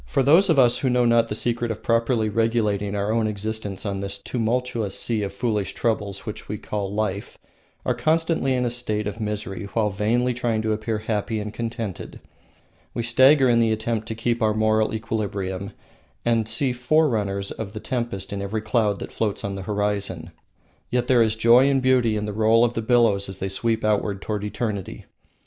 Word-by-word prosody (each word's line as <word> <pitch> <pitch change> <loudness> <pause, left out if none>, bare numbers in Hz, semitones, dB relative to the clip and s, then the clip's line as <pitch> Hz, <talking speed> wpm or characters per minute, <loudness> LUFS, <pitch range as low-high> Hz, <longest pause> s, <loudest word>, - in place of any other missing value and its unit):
Those 160 +9 +5
of 160 - +4
us 120 -3 +4
who 130 - 0
know 125 0 +3
not 115 -1 +4
the 105 - -4
secret 120 +1 -1
of 110 - -5
properly 115 -1 +1
regulating 105 -2 0
our 100 +1 -1
own 115 -1 +1
existence 105 -1 -4
on 100 -1 -2
this 100 0 -3
tumultuous 115 -1 -1
sea 115 -3 0
of 100 -1 -3
foolish 105 0 -2
troubles 105 -3 -2
which 105 - -7
we 105 - -3
call 100 -1 -4
life 105 -1 -3 0.5
are 125 - +2
constantly 155 +1 +1
in 125 0 0
a 120 - 0
state 110 -3 -2
of 105 +2 -5
misery 105 -1 -4
while 105 -2 +1
vainly 120 +6 +1
trying 115 -2 -1
to 110 - 0
appear 110 +1 -2
happy 110 0 -2
and 105 0 -5
contented. 115 -4 -5 0.8
We 120 - -1
stagger 130 +4 +5
in 120 -1 +4
the 115 -1 +3
attempt 110 0 -2
to 110 - -4
keep 115 +1 -1
our 110 -1 +2
moral 110 0 +2
equilibrium, 100 -3 -3 0.5
and 115 -2 +1
see 125 +3 +1
forerunners 120 -7 +1
of 105 -2 -6
the 110 - -5
tempest 115 -6 -3
in 100 - -3
every 105 +2 -3
cloud 110 -2 +1
that - - -7
floats 105 -3 -2
on 100 - -3
the 100 - -5
horizon. 100 -5 -1 0.6
Yet 125 -1 0
there 125 -2 +4
is 110 -1 +2
joy 120 +4 +5
and 135 -1 +3
beauty 125 -4 +2
in 105 - -2
the 105 - -4
roll 110 +2 +4
of 120 - -1
billows 110 -6 +3
as 95 - -4
they 95 0 -3
sweep 110 +3 -1
outward 105 -2 0
toward 105 0 -3
eternity. 105 -2 -4
110 Hz, 190 wpm, -23 LUFS, 105-120 Hz, 0.8 s, Those